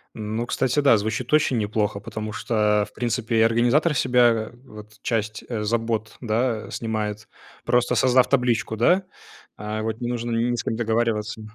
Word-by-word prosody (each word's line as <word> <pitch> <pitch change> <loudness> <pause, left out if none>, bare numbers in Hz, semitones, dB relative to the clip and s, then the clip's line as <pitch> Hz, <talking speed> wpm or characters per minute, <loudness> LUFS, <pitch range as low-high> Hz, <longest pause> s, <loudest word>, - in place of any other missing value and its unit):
Ну, 110 +2 -3
кстати, 130 +3 0
да, 135 -5 +5
звучит 110 +5 -3
очень 145 -5 +3
неплохо, 105 -1 -1
потому 110 +1 -6
что, 105 -2 +1
в - - -30
принципе, 120 -1 -1
и - - +5
организатор 120 +8 +3
с - - +2
себя 120 -3 +3
вот 105 -2 -13
часть, 110 -2 -2
э, 110 -3 -3
забот, 115 0 -2
да, 115 -1 -1
снимает, 105 -2 -4 0.3
просто 125 0 +2
создав 130 -1 +4
табличку, 125 -4 +1
да. 175 - +3 0.5
А 105 +1 -4
вот, 110 +2 -4
не 120 - -2
нужно 120 -1 -3
ни 115 +1 +1
с - - -3
кем - - -2
договариваться. 110 -1 -1
115 Hz, 165 wpm, -23 LUFS, 110-120 Hz, 0.5 s, да